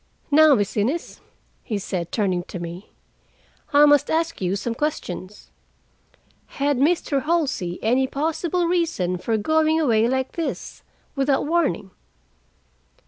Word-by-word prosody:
Now, 305 0 +7
Miss 205 -4 -1
Innes," 250 +11 -2 0.4
he 215 - -3
said, 185 -4 -4
turning 190 -5 0
to 190 - -7
me, 170 +3 -8 0.8
"I 290 0 +7
must 290 -1 +4
ask 330 -3 -1
you 185 +1 0
some 230 +3 -3
questions. 210 - -5 1.1
Had 280 -1 +1
Mr. 290 -2 +1
Halsey 275 - -1
any 255 +4 +2
possible 325 +5 -1
reason 330 - 0
for 225 +4 -1
going 315 +7 +2
away 230 -7 +3
like 260 +1 -1
this, 335 -2 -5 0.3
without 275 0 +1
warning?" 295 - 0
270 Hz, 125 wpm, -23 LUFS, 205-315 Hz, 1.1 s, Now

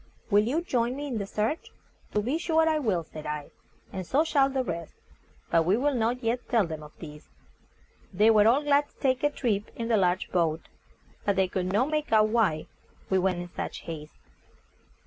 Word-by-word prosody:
Will 205 +1 +5
you 285 +8 0
join 245 -5 0
me 290 +1 -5
in 250 -6 -3
the 200 - -4
search?" 215 +10 -2 0.4
"To 210 - +2
be 275 +8 -1
sure 320 -1 +2
I 315 -1 +2
will," 200 - 0
said 155 -1 -9
I; 150 -1 -5 0.4
"and 190 -1 -3
so 275 - +2
shall 280 -4 +3
the 265 -1 -1
rest; 170 -6 -5 0.6
but 165 - +4
we 185 +6 +2
will 285 +3 +1
not 240 +1 0
yet 235 +2 -1
tell 225 -5 +3
them 160 -2 -6
of 150 0 -11
this." 150 -2 -11 0.8
They 210 +4 +5
were 215 -1 +5
all 265 +6 +4
glad 290 0 +3
to - - -32
take 260 -2 0
a 290 - +3
trip 220 -8 -1
in 230 0 -4
the 225 - +4
large 180 -1 +1
boat, 165 -3 +1 0.6
but 200 - +1
they 190 0 +2
could 185 0 -2
not 250 +9 +1
make 305 0 -1
out 215 -1 +5
why 210 -9 +1 0.5
we 190 - +4
went 180 -1 0
in 175 - -10
such - - -4
haste. 155 -2 -8
215 Hz, 205 wpm, -27 LUFS, 180-265 Hz, 0.8 s, Will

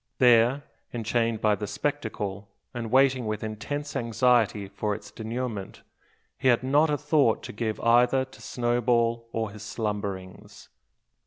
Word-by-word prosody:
There, 125 +3 +5 0.3
enchained 115 -1 -1
by 105 -1 +3
the 105 0 -3
spectacle, 100 +1 -3 0.2
and 120 -2 -4
waiting 130 -1 +3
with 110 0 -3
intense 145 +8 -5
anxiety 115 -4 +2
for 100 +1 -2
its 105 0 -11
denouement, 110 -2 -5 0.6
he - - 0
had 120 0 +4
not 145 +4 +3
a 150 - +1
thought 145 -5 +2
to - - -7
give 110 0 -3
either 125 +3 +4
to 130 - -17
Snowball 120 -1 0
or 110 -2 -2
his 105 0 -11
slumberings. 100 -1 -5
115 Hz, 140 wpm, -26 LUFS, 105-125 Hz, 0.6 s, There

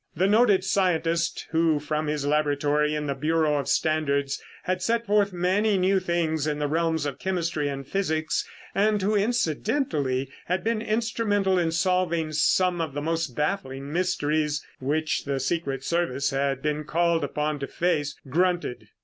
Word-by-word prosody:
The 180 +4 +2
noted 205 -2 +4
scientist, 170 -3 0
who 160 -2 +2
from 150 +1 -2
his 150 -1 -1
laboratory 150 0 +1
in 150 0 -2
the 140 - -1
Bureau 150 +1 +1
of 140 - -4
Standards 140 -1 0 0.2
had 185 0 -1
sent 230 +4 0
forth 205 -1 +2
many 190 +4 +1
new 190 +1 +3
things 165 -4 0
in 150 -1 -1
the 150 0 -1
realms 160 0 0
of 145 - -4
chemistry 170 -5 -1
and 135 -1 -5
physics, 160 -4 0 0.3
and 210 +1 +2
who, 205 +2 +1
incidentally, 170 - 0 0.2
had 180 0 0
been 225 0 0
instrumental 215 -4 +1
in 165 -2 +1
solving 170 -2 +1
some 175 +3 +2
of 155 -4 -4
the 145 - -2
most 165 -5 -1
baffling 145 -4 -2
mysteries 150 -4 0
which 155 +4 -1
the 140 -1 -1
secret 135 -1 -2
service 140 -5 0
had 135 0 -1
been 150 0 -1
called 170 +1 +1
upon 150 +1 -2
to 140 - -4
face, 150 -4 -1
grunted. 165 -7 0
160 Hz, 160 wpm, -26 LUFS, 145-185 Hz, 0.3 s, noted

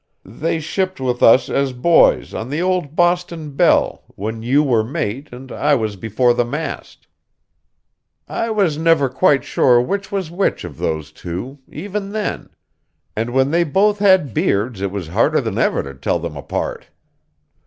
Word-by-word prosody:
They 155 - -2
shipped 185 +3 -2
with 125 -2 -2
us 115 - +6
as 135 -1 0
boys 165 +7 +3
on 115 +3 -5
the 145 +3 -2
old 180 -5 -1
Boston 175 -3 0
Belle, 140 - +2
when 110 +3 -5
you 135 +6 +2
were 120 -6 +2
mate 125 +3 -4
and 125 +2 -10
I 145 0 +2
was 110 -5 -2
before 115 +5 +1
the 120 0 +1
mast. 150 +7 -6 1.2
I - - -2
never 165 -7 +2
was 130 - -22
quite 145 -7 +3
sure 125 -2 +3
which 195 +11 -2
was 190 -5 -3
which 190 +3 -1
of - - -8
those 80 -2 -3
two, 95 - -7
even 200 +4 -5
then; 215 -1 -3 0.7
and 115 +2 -2
when 135 +3 +1
they 170 +1 +3
both 200 +6 +2
had 190 - +4
beards 100 +1 0
it 100 - -1
was 95 -4 -6
harder 85 - +2
than - - -3
ever - - +1
to 70 - -8
tell 65 - -1
them - - -6
apart. - - -4
140 Hz, 165 wpm, -19 LUFS, 115-175 Hz, 1.2 s, us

